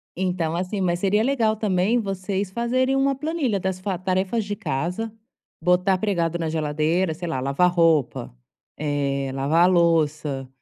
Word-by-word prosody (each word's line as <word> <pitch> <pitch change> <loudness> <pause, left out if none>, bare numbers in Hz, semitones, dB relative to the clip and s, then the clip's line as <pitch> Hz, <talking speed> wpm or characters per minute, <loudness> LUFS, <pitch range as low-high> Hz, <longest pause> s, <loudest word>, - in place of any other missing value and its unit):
Então, 180 -3 -1
assim, 185 +3 -2
mas 175 -1 0
seria 205 +3 +2
legal 230 -5 +1
também 210 +2 +1
vocês 195 -1 -3
fazerem 255 +4 +1
uma 275 0 +2
planilha 285 - -1
das 185 0 -2
fa 185 -1 -2
tarefas 190 +4 -1
de 205 0 -3
casa, 180 +10 -3 0.5
botar 180 +2 +3
pregado 175 -4 0
na 160 -1 -1
geladeira, 160 +3 0
sei 175 +2 -6
lá, 135 -6 -2
lavar 140 +7 +2
roupa, 160 - +1 0.4
eh, 140 -2 -1
lavar 145 +6 +2
a - - +5
louça, 155 -6 +1
180 Hz, 155 wpm, -23 LUFS, 160-205 Hz, 0.5 s, a